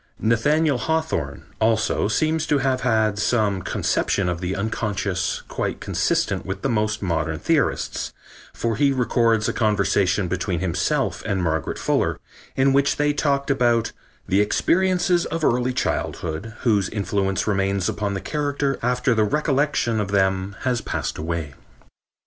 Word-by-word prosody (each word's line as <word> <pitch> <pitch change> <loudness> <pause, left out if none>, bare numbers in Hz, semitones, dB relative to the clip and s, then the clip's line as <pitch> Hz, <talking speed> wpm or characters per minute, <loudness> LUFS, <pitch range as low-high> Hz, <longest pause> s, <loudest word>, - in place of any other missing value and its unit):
Nathaniel 140 +6 +2
Hawthorne, 160 - -2 0.2
also, 110 -1 +2
seems 155 +7 0
to 145 - +3
have 130 -1 0
had 110 -4 +1
some 105 -4 +1
conception 95 +2 0
of 85 0 -3
the 90 +1 -2
unconscious 100 -2 -2
quite - - -3
consistent - - 0
with 95 +1 -5
the 135 - +1
most 110 -2 0
modern 80 -3 -1
theorists, - - 0 0.4
for 115 -2 -2
he 140 +1 +3
records 115 -4 +2
a - - 0
conversation 100 -3 +1
between 90 -1 -2
himself 85 -2 0
and 100 -4 -1
Margaret 80 -1 -1
Fuller - - 0 0.4
in 135 0 +3
which 140 0 +3
they 145 0 +1
talked 140 -1 0
about 120 -4 +2 0.4
"the 100 +2 +3
experiences 180 - +2
of 165 -1 -4
early 125 +1 +2
childhood, 105 -4 -3
whose 105 -5 +2
influence 100 -1 -1
remains 95 -2 0
upon 100 -1 -2
the 95 - -3
character 145 -2 -1
after 125 +1 +1
the 110 -1 +2
recollection 140 -2 +1
of 100 -2 -2
them 95 0 +1
has 125 -2 0
passed - - -3
away." 80 -2 -3
110 Hz, 145 wpm, -23 LUFS, 95-135 Hz, 0.4 s, to